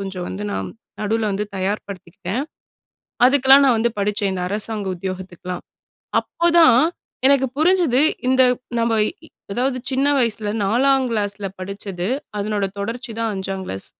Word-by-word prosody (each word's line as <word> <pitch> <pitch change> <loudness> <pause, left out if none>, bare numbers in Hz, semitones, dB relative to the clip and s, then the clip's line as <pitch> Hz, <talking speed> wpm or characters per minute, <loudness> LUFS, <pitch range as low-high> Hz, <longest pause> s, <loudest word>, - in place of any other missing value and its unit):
கொஞ்ச 195 -1 -5
வந்து 200 +2 -5
நான், - - -3 0.3
நடுவுல 215 +1 0
வந்து 200 +2 -1
தயார்படுத்திக்கிட்டேன். 190 +2 -4 0.8
அதுக்குலாம் 270 +1 +6
நான் 245 -4 +4
வந்து 235 +1 +1
படிச்சேன். 200 -1 0
இந்த 180 - -3
அரசாங்க 210 -1 -3
உத்தியோகத்துக்குலாம். 180 -1 -6 0.6
அப்போதான் 340 -7 +4 0.5
எனக்கு 270 -1 +4
புரிஞ்சுது, 330 -6 +3 0.3
இந்த 260 0 +5 0.4
நம்ம 230 0 +1 0.2
இ - - -3 0.4
அதாவது, 255 +3 0
சின்ன 270 +2 +1
வயசுல 225 -3 0 0.2
4ங் 265 +5 +3
கிளாஸ்ல 205 -2 -2
படிச்சது. 190 -1 -5 0.3
அதனோட 205 0 -1
தொடர்ச்சி 230 +4 -4
தான் 225 -1 0
5ங் 190 0 -4
கிளாஸ். 95 - -5
215 Hz, 130 wpm, -21 LUFS, 195-260 Hz, 0.8 s, அதுக்குலாம்